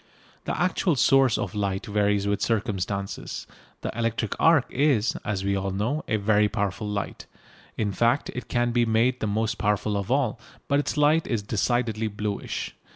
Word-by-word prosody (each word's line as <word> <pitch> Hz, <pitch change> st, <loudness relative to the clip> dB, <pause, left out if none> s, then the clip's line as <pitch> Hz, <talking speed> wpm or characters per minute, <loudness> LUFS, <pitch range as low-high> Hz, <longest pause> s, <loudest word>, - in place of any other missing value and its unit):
The -, -, -2 dB
actual 180 Hz, -1 st, +1 dB
source 135 Hz, -1 st, +4 dB
of -, -, -3 dB
light 100 Hz, -2 st, -2 dB
varies 105 Hz, -1 st, +1 dB
with 100 Hz, 0 st, 0 dB
circumstances. 100 Hz, -3 st, -2 dB, 0.4 s
The -, -, -4 dB
electric 115 Hz, -2 st, -1 dB
arc 160 Hz, -5 st, +5 dB
is, 135 Hz, -5 st, +2 dB
as 100 Hz, -2 st, -2 dB
we 100 Hz, 0 st, +1 dB
all 95 Hz, 0 st, -1 dB
know, 110 Hz, +11 st, -1 dB
a 110 Hz, -, +1 dB
very 105 Hz, 0 st, +3 dB
powerful 100 Hz, -1 st, -2 dB
light, 105 Hz, -1 st, -4 dB, 0.5 s
in 105 Hz, -2 st, 0 dB
fact 120 Hz, +7 st, +1 dB
it 125 Hz, -2 st, -6 dB
can 120 Hz, 0 st, +1 dB
be 120 Hz, 0 st, +3 dB
made 115 Hz, +3 st, +2 dB
the 110 Hz, -, -1 dB
most 110 Hz, +2 st, -1 dB
powerful 105 Hz, 0 st, 0 dB
of 100 Hz, -1 st, -2 dB
all, 130 Hz, -3 st, +1 dB, 0.3 s
but 140 Hz, 0 st, +2 dB
its 145 Hz, -, -2 dB
light 150 Hz, +2 st, +3 dB
is 115 Hz, -4 st, -1 dB
decidedly 110 Hz, +1 st, 0 dB
bluish. 105 Hz, -1 st, -4 dB
110 Hz, 170 wpm, -25 LUFS, 100-125 Hz, 0.5 s, arc